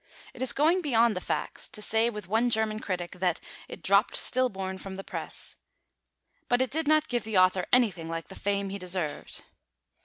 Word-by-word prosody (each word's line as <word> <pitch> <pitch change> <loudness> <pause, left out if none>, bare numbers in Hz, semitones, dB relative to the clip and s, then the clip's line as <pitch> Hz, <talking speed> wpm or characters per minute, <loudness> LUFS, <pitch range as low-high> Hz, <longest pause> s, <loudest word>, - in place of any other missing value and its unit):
It - - -11
is 260 - +6
going 325 +6 +3
beyond 235 -7 +3
the 180 - -3
facts - - -3
to - - -6
say 220 +2 +2
with 210 -5 -7
one 225 +5 +2
German 220 -1 +1
critic 180 -4 -4
that 180 -2 +1 0.3
"it - - -10
dropped 200 +3 +3
stillborn 190 -7 0
from 190 0 -7
the 195 - -7
press"; - - -3 0.9
but 245 - +3
it 260 -2 0
did 315 +1 -1
not 310 0 +4
give 240 -2 -1
the 220 -2 -1
author 185 0 +4
anything 200 -10 +2
like 165 0 -5
the - - -9
fame 200 0 -2
he 200 +1 -5
deserved. 180 -4 -2
210 Hz, 190 wpm, -28 LUFS, 185-245 Hz, 0.9 s, is